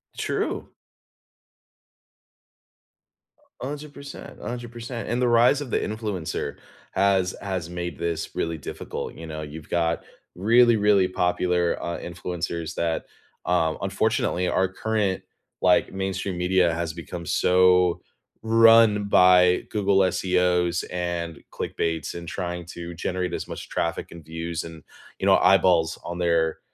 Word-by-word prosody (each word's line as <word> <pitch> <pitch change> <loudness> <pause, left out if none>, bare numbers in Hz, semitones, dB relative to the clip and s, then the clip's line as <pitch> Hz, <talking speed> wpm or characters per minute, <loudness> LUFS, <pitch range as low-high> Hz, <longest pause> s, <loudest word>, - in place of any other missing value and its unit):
True. - - -2 2.9
100%, 145 +1 -8
100%. 120 -1 -6
And 120 +1 0
the 125 - +3
rise 120 +4 +4
of 135 -4 -6
the - - +2
influencer 105 -6 -3 0.4
has 95 -2 +2
has 95 -4 -3
made 85 0 -5
this 85 -1 -3
really 85 -1 -2
difficult, 70 - -6
you 80 - -9
know? 80 0 -5
You've 75 +1 -9
got 85 -1 0 0.3
really, 115 +5 +5
really 105 -3 +4
popular, 90 -1 +1
uh, 85 - -3
influencers 85 -1 -4
that, 85 -1 -1 0.4
uh, 80 -2 +2
unfortunately, 90 +1 0
our 95 0 +2
current, 105 -1 -1 0.4
like, - - +3
mainstream 95 -1 -3
media 90 -1 +2
has 80 -1 -3
become 85 0 -7
so 90 +1 +3 0.4
run 115 -2 +6
by 90 -2 +5
Google 100 -2 +2
SEOs 90 -1 +1
and 85 -3 -3
clickbait's 80 -3 -3
and 85 0 -8
trying 90 -1 -4
to 85 0 -7
generate 90 +1 -3
as - - -4
much - - -7
traffic - - -2
and 85 -2 -11
views 80 +1 -4
and, 80 -2 -10 0.4
you - - -2
know, - - +6
eyeballs 90 -3 +4
on 85 0 -5
their, 85 -2 +1
90 Hz, 125 wpm, -25 LUFS, 85-100 Hz, 2.9 s, run